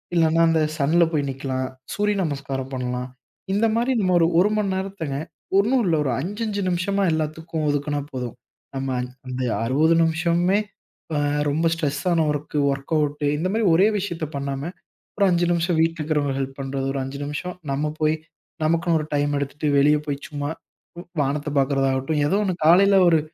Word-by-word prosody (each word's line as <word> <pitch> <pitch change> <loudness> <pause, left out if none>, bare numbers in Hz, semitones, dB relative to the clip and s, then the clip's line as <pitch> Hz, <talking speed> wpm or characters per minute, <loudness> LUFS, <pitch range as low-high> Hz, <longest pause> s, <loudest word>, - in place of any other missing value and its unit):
இல்லன்னா, 165 0 +3
அந்த 160 -1 +2 0.2
சன்ல 160 +4 +3
போயி 150 -3 +1
நிக்கலாம். 130 -1 -3 0.2
சூரிய 210 0 +1
நமஸ்காரம் 135 -3 -4
பண்ணலாம். 125 0 -3 0.4
இந்த 215 +3 +2
மாரி 240 +3 +1
நம்ம 185 -1 +2
ஒரு 165 - +4
1 210 +1 +2
மணி - - 0
நேரத்தங்க, 190 -8 -4 0.4
ஒண்ணும் 240 +5 +3
இல்லை 165 -3 +2
ஒரு 135 - 0
5, 205 +9 -4
5 205 -1 -2
நிமிஷமா 195 +3 0
எல்லாத்துக்கும் 160 0 -2
ஒதுக்குனா 145 0 -1
போதும். 125 -3 -5 0.4
நம்ம 135 0 -2
அந் 125 - -5 0.2
அந்த 130 0 -3 0.2
60 155 +7 +3
நிமிஷமுமே, 170 +4 +2 0.5
பா 150 - 0 0.3
ரொம்ப 160 +3 +1
ஸ்ட்ரெஸ்ஸான 165 +2 0
வொர்க், 150 +1 -4
வொர்க்கவுட் 145 +1 -1
இந்த 170 - -1
மாரி 225 +1 0
ஒரே 190 +5 +5
விஷயத்தை 170 -5 -3
பண்ணாம, 140 +4 -3 0.5
ஒரு 200 - +4
5 175 0 +2
நிமிஷம் 170 0 +1
வீட்டில 165 0 +1
இருக்குறவங்களுக்கு 145 -3 0
ஹெல்ப் 135 +1 -6
பண்றது, 135 0 -3
ஒரு 135 - -2
5 135 +2 -6
நிமிஷம் 155 +5 -4 0.2
நம்ம 150 +2 -1
போய், 155 0 +2 0.5
நமக்குனு 165 +1 +2
ஒரு 155 - -5
டைம் 145 0 +1
எடுத்துட்டு, 145 +2 -2
வெளிய 150 +2 +5
போய் 140 0 -3
சும்மா 145 -1 -4 0.7
வானத்த 145 +2 -1
பாக்றதாகட்டும். 135 +2 +1
ஏதோ 195 - +1
ஒண்ணு 185 -3 -1
காலையில 195 +4 +6
ஒரு 165 -2 +4
155 Hz, 165 wpm, -23 LUFS, 140-175 Hz, 0.7 s, காலையில